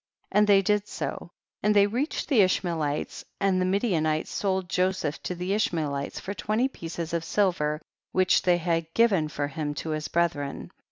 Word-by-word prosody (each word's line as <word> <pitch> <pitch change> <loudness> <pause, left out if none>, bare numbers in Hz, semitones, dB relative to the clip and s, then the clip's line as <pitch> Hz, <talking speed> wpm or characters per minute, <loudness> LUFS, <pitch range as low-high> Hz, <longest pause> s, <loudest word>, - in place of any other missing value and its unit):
24. 205 - +3
And 210 - +4
they 200 -1 +6
did 210 +1 +1
so, - - -5 0.3
and 210 0 +2
they 200 -1 +7
reached 245 +9 -2
the 260 -8 +5
Ishmaelites, 165 -6 0 0.2
and 190 -2 +2
the - - +2
Mi 190 +2 +2
dianites 155 -8 0
sold 190 -2 -1
Joseph 180 -4 0
to 180 - -4
the 180 +2 -2
Ishmael 165 -8 0
ites 140 0 -4
for 195 - -5
twenty 215 +6 0
pieces 170 -8 -6
of 170 -1 0
silver 165 -5 +1 0.3
which 185 0 +3
they 180 -1 +3
had 165 -1 -1
given 200 -9 +4
for 145 -1 -3
him 145 0 -4
to 160 - -4
his 155 0 -2
bre 170 - +2
thren. 145 -5 -3
180 Hz, 190 wpm, -27 LUFS, 155-200 Hz, 0.3 s, they